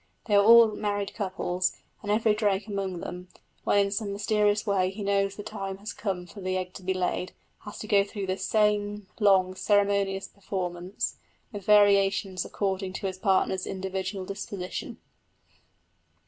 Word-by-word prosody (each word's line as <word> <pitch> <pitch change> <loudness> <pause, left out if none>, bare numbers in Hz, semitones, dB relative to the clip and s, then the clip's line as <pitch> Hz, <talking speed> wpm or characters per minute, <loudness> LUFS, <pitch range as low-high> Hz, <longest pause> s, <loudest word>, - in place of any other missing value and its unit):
They 215 - -2
are 200 0 +6
all 230 +1 +8
married 205 -1 -2
couples; 185 -3 -2 0.2
and 205 - -3
every 220 0 +3
drake 205 -2 0
among 195 -4 -3
them, 180 +1 -7 0.4
when - - +3
in 200 0 +3
some 200 0 -2
mysterious 210 +1 +1
way 190 -3 +2
he 200 +2 -6
knows 195 0 +1
the 205 - -7
time 195 -2 -5
has 205 +1 -7
come 190 -4 -3
for 200 +3 -11
the 185 0 -1
egg 185 0 -4
to - - -9
be 185 +1 -2
laid, 185 0 -2 0.3
has 210 - -8
to 215 - -7
go 200 -1 +4
through 200 0 -5
the 185 0 -2
same 210 -1 +1
long 190 -3 +4
ceremonious 200 0 +1
performance, 185 -1 -4 0.3
with 205 -4 -7
variations 200 -3 +4
according 190 -1 -2
to 195 - -5
his 185 -1 -3
partner's 190 -1 +1
individual 190 0 -4
disposition. 195 -1 -5
200 Hz, 160 wpm, -27 LUFS, 185-205 Hz, 0.4 s, all